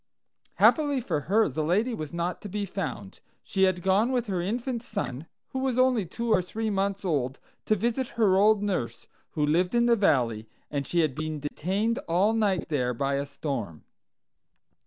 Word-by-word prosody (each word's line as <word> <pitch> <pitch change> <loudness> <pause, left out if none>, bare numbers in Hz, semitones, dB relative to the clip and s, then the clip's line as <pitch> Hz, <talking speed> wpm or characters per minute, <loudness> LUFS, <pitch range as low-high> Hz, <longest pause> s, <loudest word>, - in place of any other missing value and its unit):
"Happily 290 -3 +4
for 225 -10 -1
her, 220 +2 +4
the 155 +2 -2
lady 210 +10 +1
was 155 -8 -5
not 170 +1 -3
to 205 - -7
be 205 +1 -2
found. 155 - -5 0.2
She 190 0 +2
had 180 -2 0
gone 200 +6 +3
with 245 -2 0
her 190 -5 -2
infant 235 +5 -2
son, 165 - -5 0.2
who 265 - -4
was 260 -2 0
only 255 -7 +3
two 230 +6 -3
or 185 - +4
three 220 +4 -3
months 195 0 -1
old, 135 -6 -1 0.3
to 215 - +4
visit 235 +5 -1
her 205 -5 +4
old 205 +1 +4
nurse, 150 - -2 0.3
who 150 -2 +1
lived 175 +7 +1
in 235 0 +4
the 240 -1 +5
valley; 120 - +1 0.2
and 140 -2 -2
she 175 - +2
had 155 -4 +1
been 155 +1 -4
detained 190 +10 -1
all 185 +6 +3
night 205 -6 +1
there 125 -5 0
by 140 +3 -1
a 140 +1 -1
storm. 120 - -5
190 Hz, 185 wpm, -27 LUFS, 150-225 Hz, 0.3 s, the